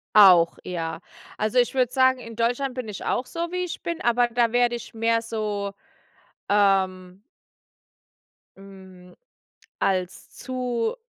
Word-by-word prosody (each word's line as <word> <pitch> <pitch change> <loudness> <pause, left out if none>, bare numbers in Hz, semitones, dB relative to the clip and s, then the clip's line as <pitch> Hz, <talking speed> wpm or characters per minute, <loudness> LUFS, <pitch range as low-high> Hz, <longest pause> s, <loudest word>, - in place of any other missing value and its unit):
Auch, 180 -5 +7
ja. 165 -2 -4 0.4
Also 215 +4 +1
ich 245 - +2
würde 250 -2 +2
sagen, 260 0 +3
in 230 -2 -10
Deutschland 245 +4 0
bin 250 -3 -5
ich 210 - -7
auch 250 - -1
so, 335 +3 -4
wie 360 0 -2
ich 345 - -7
bin, 335 -1 -4
aber 240 0 +3
da 235 -1 +1
werde 245 0 +2
ich 235 -1 -9
mehr 230 0 +1
so, 210 -3 -3 0.8
ähm 190 -2 +1 1.4
Hm, 190 -2 -15 0.6
als 185 -1 -1
zu 250 - -2
225 Hz, 135 wpm, -24 LUFS, 195-245 Hz, 1.4 s, Auch